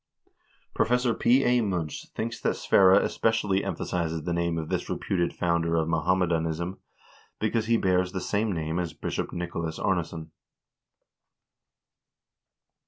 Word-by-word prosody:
Professor 125 0 +2
P. 130 +4 +3
A. 125 0 +3
Munch 90 -7 -3
thinks 115 0 -4
that - - +1
Sverre 95 -1 +5
especially 105 -1 +1
emphasizes 80 -3 -2
the 85 - -2
name 85 -1 0
of 80 -1 -3
this - - -2
reputed 85 -3 -1
founder 85 -1 0
of 80 -1 +1
Mohammedanism, 85 +1 0 0.6
because 110 +1 0
he 115 0 +4
bears 90 -2 +1
the 95 - -3
same 105 +3 -1
name 80 -1 -2
as 85 -4 -3
Bishop - - -4
Nico 85 -1 -4
las 80 -1 -4
Arnesson. 85 -3 -2
90 Hz, 130 wpm, -27 LUFS, 85-105 Hz, 0.6 s, Sverre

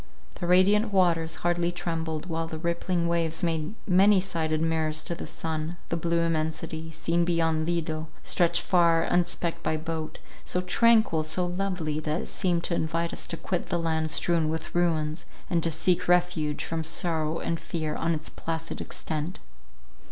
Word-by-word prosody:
The 175 - -2
radiant 200 +5 +4
waters 170 -4 +2
hardly 175 0 +2
trembled, 165 -2 -3
while 165 -2 -2
the 160 - -5
rippling 170 +1 -1
waves 165 0 0
made 165 +2 -1
many 195 +2 +5
sided 160 -4 -1
mirrors 160 -1 0
to - - -3
the 170 - -6
sun; 160 +1 -3
the - - 0
blue 170 0 +1
immensity, 160 0 -2
seen 165 +2 0
beyond 165 -2 +1
Lido, 160 -2 -1 0.2
stretched 170 -1 +2
far, 170 -2 +4
unspecked 175 -1 0
by 160 - 0
boat, 160 0 -4 0.3
so 180 - -1
tranquil, 220 -2 +4
so 155 +3 0
lovely, 175 -4 -2
that 155 +2 -1
it - - -6
seemed 175 -3 0
to - - -1
invite 165 +1 -1
us - - -3
to 165 - -4
quit 180 +1 -3
the 175 - 0
land 160 -1 0
strewn 165 0 +2
with 160 0 -4
ruins, 160 -2 0 0.3
and 170 -2 +2
to 165 - +1
seek 175 +3 +1
refuge 175 -4 +2
from 165 -1 -3
sorrow 160 -1 0
and 165 -1 -2
fear 155 -3 -3
on 165 0 0
its 155 0 -5
placid 165 0 -4
extent. 155 +3 -4
165 Hz, 165 wpm, -27 LUFS, 160-175 Hz, 0.3 s, many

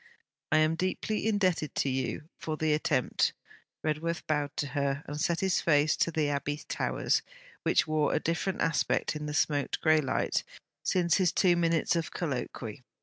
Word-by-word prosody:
'I 155 - +5
am 155 +1 +3
deeply 185 +5 -1
indebted 185 -8 +1
to - - +1
you 135 +3 -2 0.2
for 155 -1 -3
the 155 -1 +1
attempt.' 145 -4 +1 0.5
Redworth 160 +2 -2
bowed 145 -1 -1
to 145 - -1
her 140 +1 -1
and 150 +1 -5
set 170 +1 +1
his 190 -2 +2
face 150 -1 +3
to - - +2
the 155 -2 0
Abbey 145 +1 -2
towers, - - 0 0.4
which - - +3
wore 155 -1 +1
a - - +2
different 175 +3 -1
aspect 160 -1 +1
in 150 0 -4
the 150 - -3
smoked 145 -3 +1
grey 155 -1 +4
light 135 - 0 0.4
since 175 -2 +2
his 185 -3 +3
two 180 -3 +4
minutes 170 0 +2
of 165 -3 -1
colloquy. 125 -7 -4
155 Hz, 170 wpm, -29 LUFS, 145-170 Hz, 0.5 s, I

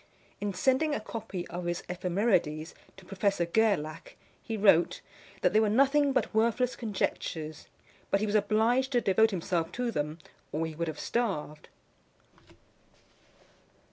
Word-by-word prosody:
In 205 0 -2
sending 265 +9 +1
a - - -2
copy 215 -5 -6
of 175 +1 -5
his 175 0 -2
Ephemerides 180 -3 0 0.2
to 190 - -14
Professor 195 -1 0
Gerlach, 210 - 0 0.3
he 225 -2 -4
wrote, 195 -5 +4 0.4
that - - +2
they 215 - +5
were 220 -1 +3
nothing 275 +5 +4
but 260 - 0
worthless 235 +3 +2
conjectures; 165 -7 -3 0.4
but 195 - +2
he 215 - 0
was 210 - -2
obliged 225 +6 +2
to 245 - +4
devote 220 +3 +4
himself 175 -3 -2
to 245 -1 -1
them, 150 -3 -2 0.3
or 160 +2 -1
he 160 - -5
would 170 +2 -3
have 155 -2 -5
starved. 185 -11 -2
205 Hz, 140 wpm, -29 LUFS, 170-230 Hz, 0.4 s, they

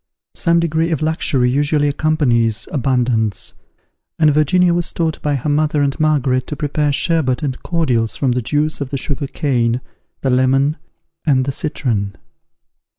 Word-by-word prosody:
Some 170 0 +2
degree 165 0 0
of 160 -2 -1
luxury 135 -5 +1
usually 145 +2 +1
accompanies 125 -8 +1
abundance; 120 -5 0 0.6
and 155 -2 +4
Virginia 170 +4 +3
was 175 0 -1
taught 165 -2 -2
by 145 -1 0
her 135 +2 -3
mother 150 0 +1
and 140 -1 -1
Margaret 140 -5 +1
to 150 - -4
prepare 145 +1 0
sherbert 150 -2 0
and 130 -3 -3
cordials 125 -10 0
from 135 -3 0
the 125 +1 0
juice 150 +6 -1
of 140 - -3
the 140 - -2
sugar 140 +1 -1
cane, 125 -4 0 0.4
the 135 - 0
lemon 135 +4 +2 0.5
and 130 -4 +2
the 140 - -1
citron. 115 -9 -2
145 Hz, 150 wpm, -18 LUFS, 130-155 Hz, 0.6 s, and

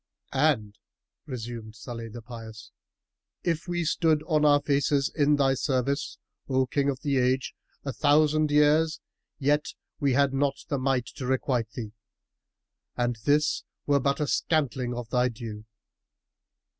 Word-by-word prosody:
'" - - -17 0.2
"And" 105 -8 -2 0.5
(resumed 115 -3 -6
Salih 115 0 -7
the 115 +1 -9
Pious) 110 -1 -10 0.7
"if 165 -1 -1
we 175 -1 -1
stood 155 -1 +2
on 155 -2 +1
our 145 -1 +6
faces 140 -1 +1
in 150 -1 +3
thy 135 -2 +3
service, 135 +1 -1 0.3
O 130 0 +2
King 140 +2 0
of 135 -1 -3
the 140 -2 0
Age, 130 +1 +1 0.3
a 135 - -2
thousand 150 +4 +3
years, 150 +2 +3 0.4
yet 145 +1 +1 0.3
had 140 0 +3
we - - -1
not 140 0 +1
the 140 -4 0
might 130 -2 +1
to 130 -4 -4
requite 125 -3 0
thee, 110 -4 -6 1.1
and 120 -1 0
this 150 +1 +2 0.2
were 145 -1 +3
but 140 +1 0
a 150 - +1
scantling 130 -6 0
of 120 -1 -5
thy 125 0 +3
due." 110 -2 -8
135 Hz, 145 wpm, -27 LUFS, 120-150 Hz, 1.1 s, our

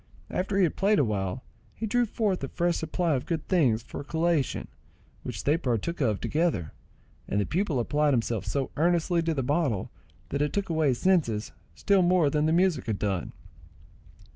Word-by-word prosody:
After 195 +2 -1
he 195 - +4
had 170 - +1
played 205 +2 +3
awhile, 105 - -1 0.3
he 225 - -4
drew 240 +2 +1
forth 205 -6 -1
a - - -1
fresh 175 +4 0
supply 165 +1 0
of 130 - -2
good 165 -3 -3
things 130 - +2
for - - -8
a - - -5
collation, 160 -2 0 0.5
which 105 -7 -6
they 150 +3 +3
partook 140 - -2
of 110 -6 +1
together, 150 - 0 0.6
and 100 - 0
the 100 - +1
pupil 170 -6 0
applied 145 +5 +1
himself 115 -3 -1
so 130 +8 -2
earnestly 170 +1 +2
to 165 -1 -1
the 135 - -1
bottle 140 - 0 0.4
that 140 - -2
it 150 - 0
took 200 -2 -1
away 160 -2 +2
his 130 -3 +2
senses 145 - +1 0.2
still 200 - +3
more 175 -4 +3
than 150 +1 +1
the - - +2
music 170 -6 +2
had 110 -3 -1
done. 100 -4 -2
155 Hz, 190 wpm, -27 LUFS, 120-175 Hz, 0.6 s, he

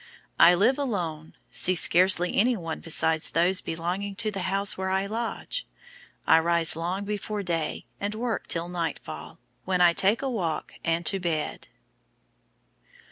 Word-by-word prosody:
I 175 - +8
live 250 +10 +3
alone, 170 - -3 0.2
see 185 - +2
scarcely 180 +1 +4
anyone 200 -8 +1
besides 160 -1 +1
those 175 +3 +2
belonging 180 +5 -3
to 215 +2 -2
the 195 - -5
house 195 +1 0
where 190 0 -3
I 190 +1 0
lodge. 235 - -4 0.6
I - - +6
rise 170 -1 +2
long 175 +4 -3
before 210 0 -3
day, 165 -4 -2
and 205 +1 -3
work 230 -1 -3
till 170 0 -1
nightfall, 170 -2 -5 0.3
when 185 -1 0
I 175 -1 +6
take 200 +8 +2
a - - 0
walk 170 -9 -3
and 165 +1 0
to 195 - +2
bed." 165 -4 -3
185 Hz, 145 wpm, -26 LUFS, 170-205 Hz, 0.6 s, I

